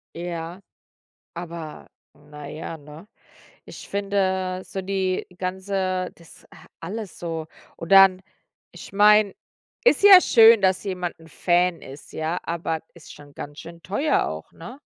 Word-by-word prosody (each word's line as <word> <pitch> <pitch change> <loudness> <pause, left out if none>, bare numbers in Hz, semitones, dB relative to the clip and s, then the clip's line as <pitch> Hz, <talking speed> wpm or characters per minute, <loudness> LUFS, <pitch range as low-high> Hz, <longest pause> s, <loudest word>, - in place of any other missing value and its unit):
Ja. 170 +1 -6 0.7
Aber 170 -3 -8 0.3
na 150 0 -12
ja, 160 +2 -7
ne? 150 +6 -14 0.6
Ich - - -11
finde 190 -2 -1
so 190 - -6
die 190 -1 -2
ganze 185 0 -2
das 170 -1 -18
a - - -16
alles 205 +3 -7
so. 165 -2 -5 0.3
Und 165 +3 -6
dann 195 -1 +7 0.5
ich - - -12
meine, 210 0 +5 0.5
ist 485 - +4
ja 390 -2 +10
schön, 225 - +6
dass 190 -1 +2
jemand 180 -3 -4
'n 160 - -16
Fan 175 +1 +1
ist, 140 +2 -12
ja, 160 +3 -2
aber 165 -1 -3
ist 170 -3 -14
schon 145 -1 -16
ganz 145 +1 -9
schön 170 0 -12
teuer 275 +11 0
auch, - - -7
ne? 250 +3 -11
185 Hz, 140 wpm, -23 LUFS, 165-195 Hz, 0.7 s, ja